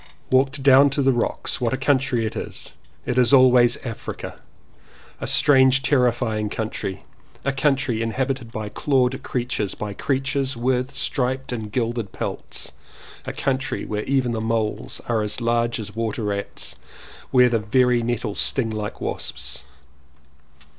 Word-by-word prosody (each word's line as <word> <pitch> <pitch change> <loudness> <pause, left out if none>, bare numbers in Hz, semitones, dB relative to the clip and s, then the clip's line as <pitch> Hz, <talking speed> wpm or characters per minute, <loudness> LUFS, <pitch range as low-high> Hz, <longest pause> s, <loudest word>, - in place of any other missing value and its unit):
Walked 135 +2 +2
down 140 +1 +7
to 140 +1 0
the 135 0 +4
rocks. 120 +1 -1
What 120 +1 +1
a - - 0
country 135 -3 +1
it 110 - -4
is! - - -6 0.3
It 125 +1 +1
is 125 0 +4
always 125 -3 +6
Africa! 115 -3 -6 0.8
a - - -4
strange 135 -1 +5
terrifying 120 -6 +1
country, 105 -3 -4 0.4
a 140 - +2
country 135 -4 +1
inhabited 125 +1 -2
by 110 -2 -4
clawed 130 +1 +1
creatures, 120 -5 -2
by 105 -1 -5
creatures 135 +2 -1
with 125 +1 0
striped 130 -1 -1
and 110 -3 -4
gilded 115 -2 -2
pelts, - - -5 0.6
a - - -1
country 135 -1 -2
where 105 0 -3
even 130 -3 +1
the 115 -1 -2
moles 110 -1 -2
are 115 -2 +1
as 105 +3 0
large 120 0 0
as 105 -1 -7
water 115 0 -2
rats, 100 -1 -3
and - - -26 0.5
where 125 -1 +5
the 115 -1 +1
very 125 +3 +2
nettles 115 -3 -2
sting 115 -5 +2
like 105 -1 -5
wasps. 60 - -4
125 Hz, 145 wpm, -23 LUFS, 110-130 Hz, 0.8 s, down